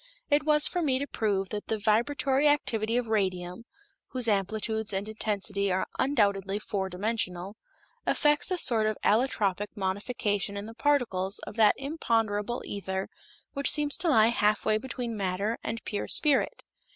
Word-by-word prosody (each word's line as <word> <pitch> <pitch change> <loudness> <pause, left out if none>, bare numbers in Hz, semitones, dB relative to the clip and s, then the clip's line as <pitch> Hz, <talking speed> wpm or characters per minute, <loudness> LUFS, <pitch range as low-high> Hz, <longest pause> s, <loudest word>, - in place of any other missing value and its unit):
It 295 +1 +3
was 300 -1 +5
for 355 - -2
me 270 -5 +2
to 280 - -2
prove 200 -7 -1
that 210 -1 -5
the 220 - -1
vibratory 265 +6 +1
activity 230 -6 +1
of 245 - 0
radium 190 -1 -2 0.4
(whose 250 -2 0
amplitudes 220 +1 0
and 195 +2 -2
intensity 205 -2 -1
are 185 +1 0
undoubtedly 200 -7 +1
four 195 -2 -3
dimensional) 190 -1 -3 0.5
effects 295 +3 +3
a 365 - 0
sort 225 -9 +4
of 215 - -1
allotropic 210 -4 +1
modification 200 0 -2
in 200 - -5
the 225 - -9
particles 225 -7 0
of - - -9
that 215 -2 +5
imponderable 230 -6 -1
ether 190 -1 -4 0.4
which 280 -2 +2
seems 295 -1 +3
to 350 - -1
lie 225 -6 +5
halfway 215 -1 +1
between 245 -2 -5
matter 200 +3 -2
and 225 - -4
pure 205 - -4
spirit. 295 -3 +2
220 Hz, 150 wpm, -28 LUFS, 200-255 Hz, 0.5 s, was